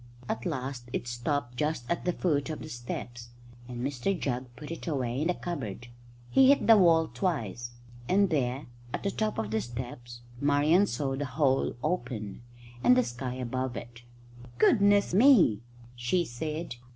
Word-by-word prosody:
At 115 -1 -2
last 130 -5 -4
it 120 - -2
stopped 120 +1 -2
just 150 -3 -1
at 170 - -2
the 180 - +2
foot 155 -5 0
of 155 - -3
the 155 - -8
steps, 120 -1 -6 0.4
and 125 0 -4
Mr 145 +7 -1
Jugg 125 -2 -2
put 150 +1 -9
it 165 - -7
away 130 -4 -1
in 160 - +1
the 180 - +1
cupboard. 120 - -5 0.4
He 265 -1 +6
hit 280 - +4
the 225 - +8
wall 165 -5 +5
twice, 120 - -2 0.4
and 195 0 +3
there, 135 -2 0 0.3
at - - -6
the 200 - 0
top 215 - -1
of 110 -1 -2
the 110 0 +1
steps, 120 0 -7 0.2
Marian 145 +7 +4
saw 135 -6 -2
the 145 +2 -2
hole 135 0 +1
open, 120 - -3 0.4
and 125 +1 +6
the 125 - +4
sky 125 +2 -5
above 130 -1 -3
it. 120 +4 -9 0.6
"Goodness 200 - +4
me!" 200 - +6 0.3
she 125 +9 0
said. 155 +2 -5
135 Hz, 165 wpm, -29 LUFS, 120-165 Hz, 0.6 s, the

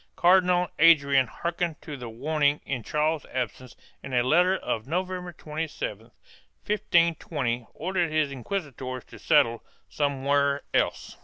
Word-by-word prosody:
Cardinal 180 -1 +4
Adrian 140 -5 +5
hearkened 170 +1 -3
to 150 - -6
the 125 -3 -7
warning 145 +5 +1
in 130 -3 -3
Charles's 150 +5 -1
absence 125 0 -4 0.3
and 135 -2 -5
in 120 - +4
a - - 0
letter 180 +8 +3
of 110 -8 -3
November 180 +2 -3
27, 150 - -5 0.6
1520, 165 - 0
ordered 175 0 -1
his 155 -2 +1
inquisitors 130 - -5
to - - -14
settle 135 -7 +3 0.3
somewhere 140 0 +1
else. - - 0
150 Hz, 130 wpm, -26 LUFS, 130-170 Hz, 0.6 s, Adrian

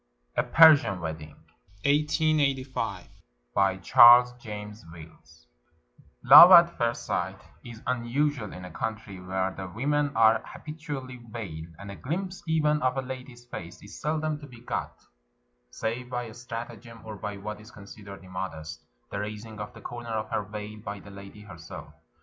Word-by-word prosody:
A - - +3
PERSIAN 150 - +6
WEDDING 80 -2 -7 2.1
BY 95 -1 +2
CHARLES 120 +3 +8
JAMES 105 -3 -8
WILLS 80 -1 -15 0.8
Love 150 +7 +11
at 170 -1 +8
first 115 0 -2
sight - - -2 0.2
is 115 -2 -11
unusual 125 0 -1
in 90 0 -9
a 90 - -10
country 110 -5 -5
where 95 +1 -2
the 95 0 -7
women 145 +8 -1
are 110 0 +5
habitually 145 -5 -8
veiled, 85 -8 -8
and 100 0 -9
a - - -8
glimpse 180 - -4
even 150 -2 +1
of 130 +1 0
a 135 - -1
lady's 125 -1 -9
face 85 -6 -9
is 100 - -12
seldom 155 0 -1
to 145 - -11
be 120 -3 -14
got, 120 - -4 0.7
save 115 - -4
by 120 -2 -4
stratagem 115 -1 -9
or 110 -1 -7
by 105 0 -6
what 105 +2 -7
is 110 - -14
considered 100 -2 -12
immodest 85 -4 -7
— - - -44
the 100 - -3
raising 105 +1 -7
of 105 0 -6
the - - -12
corner 120 -1 -8
of 110 -1 -3
her - - 0
veil 105 +1 -8
by 100 -1 -7
the 100 - -13
lady 100 +1 -12
herself. 90 -6 -11
110 Hz, 155 wpm, -27 LUFS, 100-125 Hz, 2.1 s, Love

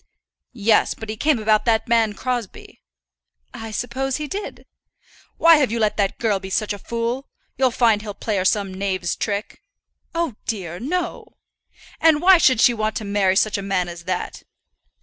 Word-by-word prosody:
"Yes; 220 -1 +2
but 220 - -9
he 215 - -3
came 290 +5 +2
about 215 -1 +2
that 225 -2 +1
man 230 -2 +2
Crosbie." 245 -3 -5 0.7
"I 225 - -7
suppose 250 +4 -3
he 305 - -4
did." 400 +6 -6 0.7
"Why 330 -1 +7
have 270 -6 +1
you 235 - -1
let 215 -2 +1
that 200 -2 0
girl 215 -4 0
be 190 0 -8
such 210 +2 -1
a 205 - -8
fool? 235 +5 -3 0.3
You'll 265 -1 +3
find 230 -3 +2
he'll 210 -2 -7
play 215 -3 -2
her 185 - 0
some 200 -1 +1
knave's 185 -2 -2
trick." 205 - -4 0.5
"Oh 330 -10 -2
dear, 180 -6 -4
no." 345 +8 -4 0.6
"And 320 -2 +4
why 365 +2 +6
should 260 -8 +4
she 245 - +6
want 215 -1 -2
to 215 - -4
marry 200 -2 +1
such 205 +1 +2
a - - -4
man 195 -2 -1
as 170 0 -9
that?" 185 -1 -4
220 Hz, 180 wpm, -21 LUFS, 200-255 Hz, 0.7 s, Why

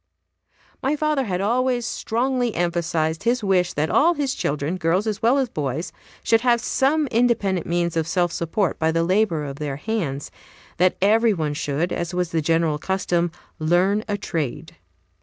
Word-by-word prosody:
My 275 +3 +1
father 300 -3 0
had 185 -3 -2
always 245 +3 +1
strongly 245 +1 -1
emphasized 165 -2 -1
his 235 +2 0
wish 185 -3 +2
that 150 +2 -1
all 340 +4 +4
his 280 -3 -1
children, 150 +5 -2
girls 180 +4 +1
as 215 -1 -2
well 240 +5 +4
as 270 -2 +1
boys, 150 - -3 0.3
should 225 0 +3
have 240 -1 +3
some 280 +6 +1
independent 225 -7 +1
means 170 0 0
of 165 -1 0
self 175 0 +1
support 170 +3 -1
by 160 0 +2
the 165 +1 +1
labor 185 -3 +1
of 140 -1 -6
their 145 -2 -3
hands; 150 -8 -3 0.5
that 180 +1 +3
every 220 +2 +4
one 155 -3 -2
should, 145 +4 -2
as 175 +1 -3
was 180 -2 -1
the 165 - +1
general 165 -1 +1
custom, 175 -1 0 0.3
"learn 180 +6 +2
a 205 -1 -1
trade." 165 - -4
180 Hz, 170 wpm, -22 LUFS, 165-230 Hz, 0.5 s, all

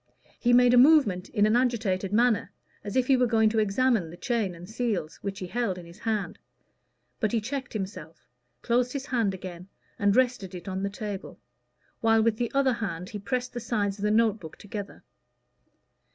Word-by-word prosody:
He 245 - +2
made 245 0 +6
a 245 - +7
movement 250 - +5
in 205 - +2
an 215 +2 +3
agitated 220 -7 0
manner, 225 -2 +2 0.3
as 205 -1 -6
if 255 -1 +3
he 270 - +4
were 250 -1 +3
going 220 -1 +3
to 220 0 0
examine 215 -3 +1
the 170 - -11
chain 225 -7 -1
and 175 +1 -11
seals, 215 -9 -2
which 200 -1 -5
he 185 - -5
held 205 -1 -2
in 175 - -9
his 170 +1 -14
hand. 220 -3 -2 0.8
But 215 - 0
he 230 - +1
checked 265 +5 -5
himself, 190 -6 -6 0.4
closed 245 +1 +1
his 275 -1 -4
hand 230 -9 0
again, 180 -1 -9 0.3
and 205 0 +3
rested 245 -8 +1
it 180 - -9
on 190 0 -3
the 200 - -1
table, 205 -1 -6 0.6
while 225 -1 +3
with 225 -1 +2
the 240 -1 -2
other 275 -2 +3
hand 185 -6 -4
he 210 -3 -6
pressed 250 +4 -3
the 240 - -4
sides 210 -4 -2
of - - -6
the 210 - +2
note 220 0 +3
book 160 -4 -10
together. 205 -1 -8
215 Hz, 195 wpm, -27 LUFS, 195-245 Hz, 0.8 s, a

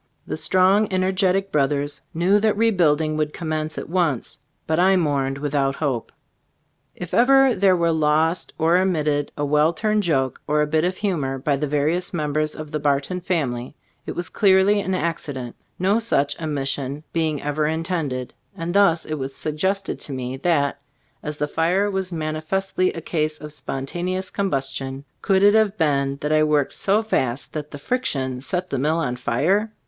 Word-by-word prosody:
The - - -4
strong, 190 +3 +3
energetic 190 +1 +1
brothers 145 0 0
knew 185 +5 +3
that 215 -1 +1
rebuilding 160 -8 +2
would 150 -1 -1
commence 155 -2 -3
at - - -5
once, 165 -7 -1 0.3
but 160 +1 0
I 190 +2 +5
mourned 140 -6 0
without 140 -1 0
hope. 135 -7 -2 0.8
If 180 -1 -8
ever 270 +1 +5
there 190 -2 +3
were 170 -1 +2
lost 160 +2 +1
or 165 +2 +3
omitted 150 -6 0
a 145 - 0
well 150 +3 +3
turned 215 +4 +1
joke 135 -8 0
or 150 0 +2
a - - +2
bit 155 +1 +1
of 185 +1 -1
humor 150 -10 -1
by 140 +2 0
the 150 +2 -2
various 155 +6 0
members 155 -1 -1
of 155 -1 -8
the 150 - -2
Bar 140 -1 +2
ton 180 +6 -5
family 140 -8 -2 0.3
it - - -3
was 175 -1 -3
clearly 195 +2 +4
an 190 -2 -1
accident, 145 -8 -3 0.2
no 195 +5 +2
such 155 -10 0
omission 140 -1 -2
being 160 -3 0
ever 150 +1 0
intended; 160 -6 -2 0.2
and 165 +1 -3
thus 195 -5 +4
it 155 -1 -4
was 135 0 -5
suggested 190 +6 -1
to - - -5
me, 130 0 -4
that, 140 -2 0 0.4
as 150 0 -5
the 150 - 0
fire 175 +7 +1
was 190 -1 -2
manifestly 165 +4 -1
a 165 - -6
case 155 -1 -2
of 150 -1 -8
spontaneous 175 +7 -4
combustion, 135 -7 -2 0.2
could 195 -1 +2
it 205 0 +7
have 215 -1 +3
been 140 -3 +1
that 150 - -1
I 155 0 +4
worked 150 -2 +1
so 205 +3 +1
fast 130 - -1
that 150 -1 -5
the 145 - -8
friction 135 - -2
set 180 +6 -3
the 135 - -1
mill 155 +4 +1
on 125 -7 -1
fire? 185 - 0
155 Hz, 175 wpm, -22 LUFS, 145-185 Hz, 0.8 s, it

